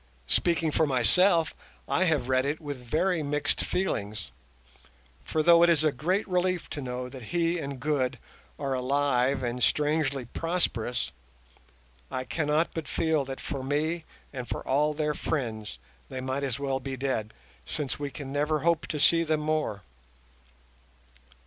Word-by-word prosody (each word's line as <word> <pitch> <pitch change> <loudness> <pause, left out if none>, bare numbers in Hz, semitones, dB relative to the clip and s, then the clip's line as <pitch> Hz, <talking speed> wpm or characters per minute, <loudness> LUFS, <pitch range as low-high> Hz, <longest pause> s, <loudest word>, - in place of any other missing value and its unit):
Speaking 165 - +2
for 155 +1 +2
myself, 165 +6 +4 0.3
I 185 - +2
have 150 -7 +1
read 130 0 +3
it 145 +3 -1
with 145 -5 -6
very 160 +7 +1
mixed 145 0 0
feelings; 105 - -2 0.9
for 155 - 0
though 170 +1 +7
it 170 - +7
is 160 -3 +4
a 155 - +4
great 180 - 0
relief 180 -1 0
to 145 - -4
know 125 -1 -4
that 125 -2 -9
he 170 +4 +1
and 140 -3 -5
Good 140 -3 0 0.4
are 140 -2 -2
alive 130 0 +1
and 120 +1 -2
strangely 145 -1 +1
prosperous, 125 -5 -1 1.0
I 130 - -3
cannot 150 +3 +1
but 165 -2 -4
feel 160 -4 +1
that 135 0 -6
for 140 -3 -4
me 155 +5 -1 0.3
and 125 -3 -5
for - - -4
all 150 +3 +2
their 150 0 0
friends 110 - -3 0.3
they 130 - -5
might 130 +2 -2
as 135 -4 -1
well 135 -1 -1
be 135 0 -5
dead, 125 -5 -1 0.4
since 145 -5 -3
we 145 -1 -2
can 135 0 -7
never 150 +1 +1
hope 170 -1 +2
to 150 - -3
see 165 +4 +5
them 155 -2 +1
more. 150 -10 -1
145 Hz, 155 wpm, -28 LUFS, 130-160 Hz, 1.0 s, though